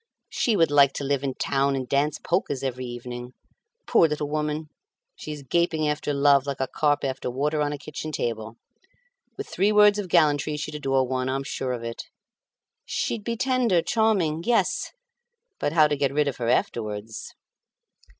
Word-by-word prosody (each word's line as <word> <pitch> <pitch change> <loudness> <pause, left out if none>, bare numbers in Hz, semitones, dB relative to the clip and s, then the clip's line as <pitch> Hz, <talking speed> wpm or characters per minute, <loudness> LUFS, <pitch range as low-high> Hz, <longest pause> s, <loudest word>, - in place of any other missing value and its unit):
She 230 - +1
would 165 -5 +3
like 140 -2 +5
to - - -4
live 140 0 0
in 135 -2 -2
town 140 0 +1
and 130 -2 -3
dance 140 +2 +1
polkas 135 -2 -1
every 130 -1 -3
evening. 120 +1 -7 0.5
Poor 170 -8 +5
little 150 -1 -2
woman! 150 +1 -2 0.5
She 155 - -8
is 150 -2 -7
gaping 160 +2 +1
after 150 0 -1
love 140 -1 +4
like 140 -1 -3
a 135 - +1
carp 145 +1 +1
after 130 -1 -2
water 150 +4 -1
on 145 0 0
a 145 - -4
kitchen 155 +2 -6
table. 115 -5 -3 0.8
With 415 - -5
three 200 +4 +1
words 210 0 +6
of 195 -3 -4
gallantry 150 -3 +3
she'd 150 +1 -5
adore 135 -3 0
one, 130 0 -1
I'm 135 +1 -1
sure 135 -2 -3
of 120 -1 -5
it. 115 0 -6 0.8
She'd 220 - -2
be 230 +1 -3
tender, 245 -9 +2
charming. 195 -9 +1
Yes; 240 +3 +1 0.7
but 145 - 0
how 155 -1 +5
to 150 - 0
get 140 -1 0
rid 150 +1 +1
of 140 - -2
her 120 -2 -2
afterwards?" 110 -2 -2
145 Hz, 180 wpm, -25 LUFS, 130-155 Hz, 0.8 s, words